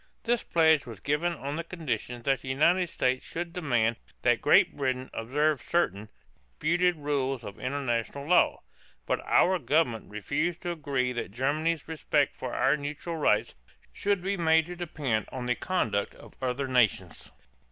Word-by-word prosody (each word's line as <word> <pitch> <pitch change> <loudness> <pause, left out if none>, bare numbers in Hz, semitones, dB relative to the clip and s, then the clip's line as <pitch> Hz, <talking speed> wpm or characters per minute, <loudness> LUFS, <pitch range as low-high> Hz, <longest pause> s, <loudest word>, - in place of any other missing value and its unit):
This 235 0 +1
pledge 160 -4 +3
was 115 -4 -8
given 150 - 0
on 145 -2 -5
the 170 - -3
condition 125 - -4
that 135 -1 +1
the 135 - -11
United 170 +6 +3
States 130 -3 0
should 170 0 -5
demand 120 -10 +1 0.3
that - - +3
Great - - +5
Britain 130 -2 -2
observe 145 +6 0
certain 105 - -1 0.5
(disputed) 175 +3 +2
rules 135 -4 -2
of 100 -1 -9
international 130 0 -2
law; 180 +4 +3 0.4
but - - 0
our 185 +1 +3
government 145 -8 +1
refused 150 - -2
to 175 - -2
agree 140 -6 -1
that 120 - -4
Germany's 145 +7 -1
respect 150 -3 0
for - - -5
our 135 +2 +3
neutral 150 +4 -5
rights 155 - +2 0.4
should 200 -3 0
be 200 +1 0
made 160 -1 +4
to 175 +1 -7
depend 145 -10 -2
on 125 -2 -5
the 125 - +2
conduct 115 - -1
of - - -15
other 130 +1 -1
nations. 125 -5 +1
145 Hz, 160 wpm, -28 LUFS, 125-165 Hz, 0.5 s, Great